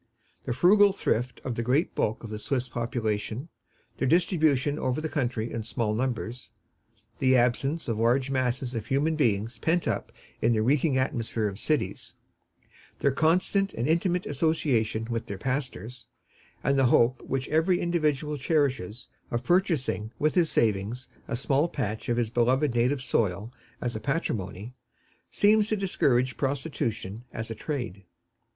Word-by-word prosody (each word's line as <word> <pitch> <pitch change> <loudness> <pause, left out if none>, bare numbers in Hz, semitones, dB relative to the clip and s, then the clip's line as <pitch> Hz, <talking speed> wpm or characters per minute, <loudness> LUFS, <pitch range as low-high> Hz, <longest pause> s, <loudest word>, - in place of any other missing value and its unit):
The 125 - -1
frugal 200 +8 +6
thrift 125 - -1
of 125 - -2
the 115 - -2
great 130 +8 +1
bulk 110 +2 -1
of 110 - -7
the 105 - -4
Swiss 130 +2 -1
population, 115 +2 -3 0.5
their 135 - +1
distribution 155 -4 +2
over 130 +2 -1
the 155 - -2
country 120 -6 -2
in 115 - -2
small 110 0 -2
numbers, 120 0 -3 0.7
the 130 0 +4
absence 130 +6 +1
of 115 -2 -1
large 125 +4 +2
masses 130 -1 -1
of 115 -2 -4
human 145 +5 +1
beings 115 -4 0
pent 165 +7 +1
up - - -2 0.3
in 115 +1 +3
the 110 -1 +1
reeking 140 +2 +2
atmosphere 115 -4 -1
of 100 0 -5
cities, 155 +4 -1 0.8
their 140 - +2
constant 185 +7 +1
and 120 - -1
intimate 175 +3 +1
association 135 -7 0
with 115 -1 -3
their 100 - -5
pastors, 125 -2 -4 0.6
and 140 0 +2
the 135 - +4
hope 120 +1 +3
which 135 0 -3
every 165 +3 +2
individual 150 -4 0
cherishes 130 - 0 0.2
of 120 +1 -2
purchasing 160 - +1
with 155 0 +1
his 170 -3 +3
savings 110 +3 0 0.2
a - - -2
small 135 +6 +1
patch 110 -8 -3
of 120 - +1
his 115 -2 0
beloved 125 +3 +2
native 125 +3 +1
soil 105 -1 -1 0.3
as 120 -2 -3
a - - -2
patrimony, 110 - -3 0.6
seem 215 +1 +4
to 215 +1 0
discourage 130 -10 +1
prostitution 125 -6 -3
as 110 +1 -5
a - - -1
trade. 115 - -5
130 Hz, 155 wpm, -27 LUFS, 115-150 Hz, 0.8 s, frugal